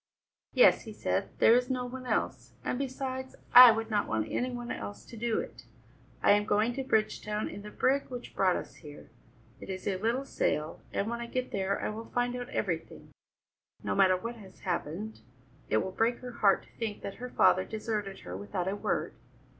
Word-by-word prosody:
"Yes," - - +6
he - - -7
said, - - -1
"there 225 - +6
is 250 +1 +3
no 255 -1 -1
one 255 +1 -7
else. - - -2
And 250 - -1
besides 260 -1 -4 0.2
I 250 0 +12
would 225 0 -2
not 210 - +1
want 110 0 -1
any 250 - 0
one 240 -1 -5
else 100 0 -6
to - - -11
do 230 0 -1
it. - - -8 0.6
I - - +6
am 205 0 +5
going 215 +3 +2
to 270 - -3
Bridgetown 215 -3 0
in 205 - -7
the 210 - -8
brig 270 +6 +1
which 245 -1 -8
brought 185 -2 +3
us - - -6
here; 150 -2 -12 0.5
it - - -10
is 190 +1 -5
a 195 -2 0
little 240 +5 0
sail, 155 - -1
and 200 - -1
when 235 +1 -3
I 235 - -5
get 255 +1 -3
there 195 0 -1
I - - -2
will 220 +2 -6
find 245 +1 -1
out 245 0 -5
everything. - - -3 0.7
No - - -1
matter 190 -2 +5
what 230 +5 -6
has 190 -4 -14
happened, 185 +4 -3 0.5
it 110 - +3
will 190 - -4
break 230 +5 +1
her 250 0 -6
heart 200 -5 +3
to - - -21
think 220 -3 -3
that 200 - -6
her 250 - -4
father 185 -5 +4
deserted 210 -2 -4
her 90 - -7
without 100 - -3
a 195 - 0
word. - - -1
220 Hz, 205 wpm, -30 LUFS, 195-245 Hz, 0.7 s, I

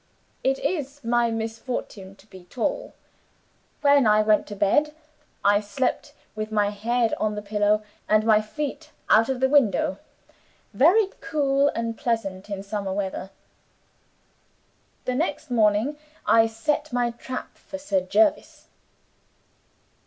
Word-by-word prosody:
It 270 0 +2
is 290 -5 -3
my 235 0 +2
misfortune 225 -3 -5
to 200 - -21
be 185 -4 -14
tall. - - -3 0.9
When 285 -4 +5
I 215 0 +5
went 215 -1 +2
to 205 - -7
bed, 295 +10 +2 0.5
I 205 0 +5
slept 210 +5 -2 0.2
with 215 0 -4
my 205 -1 +1
head 230 +3 0
on 215 -1 0
the 210 - -4
pillow, 210 +1 +1 0.3
and 215 0 +3
my 215 -1 +5
feet 280 +7 -5 0.2
out 225 +4 +5
of 265 -2 -1
the 265 - +3
window. 215 -8 +2 0.7
Very 380 +8 +4
cool 285 -3 +1
and 230 0 -2
pleasant 225 -7 -3
in 195 -1 -4
summer 200 -1 -4
weather. 190 -1 -3 1.8
The 255 - -1
next 295 0 -2
morning, 220 +5 +2 0.3
I 225 0 +5
set 290 +7 -2
my 245 -1 0
trap 255 +2 -7
for 290 - -9
Sir 210 -10 0
Jervis." 305 - +1
225 Hz, 130 wpm, -24 LUFS, 210-275 Hz, 1.8 s, When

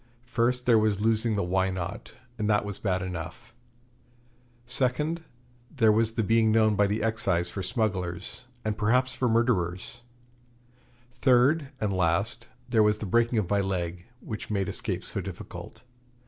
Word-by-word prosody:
First 125 +1 0
there 115 -3 +5
was 105 -2 +1
losing 110 +1 +1
the 100 - 0
Why 95 +2 +1
Not? 90 -2 -5 0.3
and 105 0 0
that 105 -1 +2
was 105 -2 -5
bad 95 -3 -1
enough; 90 +2 -7 1.1
second, 135 +6 0 0.5
there 110 -1 +3
was 110 +1 +2
the 115 - 0
being 110 +1 +3
known 110 -1 +4
by 100 0 +3
the 105 +2 -1
Excise 90 -6 0
for 100 - -4
smugglers, 95 +2 -3 0.2
and 110 -1 0
perhaps 125 +4 +3
for 125 - 0
murderers; 115 -2 0 1.1
third 135 +4 +3
and 105 -2 -1
last, 95 +7 0 0.2
there 115 -3 +3
was 105 0 +3
the 110 - -5
breaking 115 +4 +2
of 105 -5 +1
my 100 +2 +1
leg, 90 -2 -3
which 110 - -6
made 100 -3 -1
escape - - -3
so - - -3
difficult. - - -9
110 Hz, 155 wpm, -27 LUFS, 95-120 Hz, 1.1 s, there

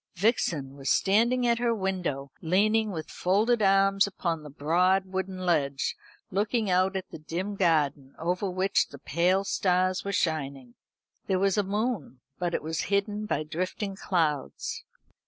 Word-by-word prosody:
Vixen 170 - 0
was 135 -1 -4
standing 235 +5 +3
at 235 -1 +2
her 235 -1 +1
window, 180 -9 -2
leaning 215 +6 +2
with 160 -6 -6
folded 215 +6 +2
arms 195 0 +4
upon 170 -5 -2
the 150 - -10
broad 180 +7 +2
wooden 190 0 -4
ledge, 140 -5 +1 0.4
looking 210 +1 0
out 185 +2 +2
at 190 0 -4
the - - -8
dim 175 +7 -4
garden, 150 -7 +1
over 180 +4 -1
which 185 +2 +1
the 140 - -11
pale 175 +8 +1
stars 185 -1 +1
were 200 - -3
shining. 140 -9 -2 0.5
There 190 - +2
was 195 0 +2
a 205 - +3
moon, 205 - -2 0.2
but 175 -1 -1
it - - -2
was 160 +1 -2
hidden 205 +1 0
by 155 - 0
drifting 185 +5 -3
clouds. 160 -8 -1
185 Hz, 155 wpm, -28 LUFS, 160-200 Hz, 0.5 s, arms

